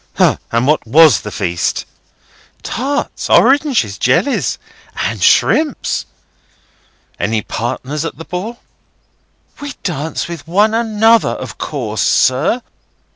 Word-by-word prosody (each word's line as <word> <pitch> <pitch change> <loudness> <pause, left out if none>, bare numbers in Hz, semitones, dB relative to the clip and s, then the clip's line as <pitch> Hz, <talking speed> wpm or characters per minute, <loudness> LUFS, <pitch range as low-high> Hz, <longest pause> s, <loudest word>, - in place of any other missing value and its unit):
"Hah! - - +3
And 115 +2 +1
what 150 -4 +1
was 155 +1 +6
the 105 - -6
feast?" 85 -4 -2 0.8
"Tarts, 280 +4 -3
oranges, 265 - +3
jellies, 195 - +1 0.4
and - - -2
shrimps." 305 -3 +2 1.1
"Any 110 +3 -1
partners 130 +5 -4
at 165 - -5
the 165 - -9
ball?" 210 +7 -6 1.0
"We 285 -1 -5
danced 160 -3 -3
with 170 -2 -8
one 205 +6 +2
another, 225 0 +3
of - - -6
course, 110 -8 -3
sir. 150 - +2
165 Hz, 110 wpm, -16 LUFS, -, 1.1 s, was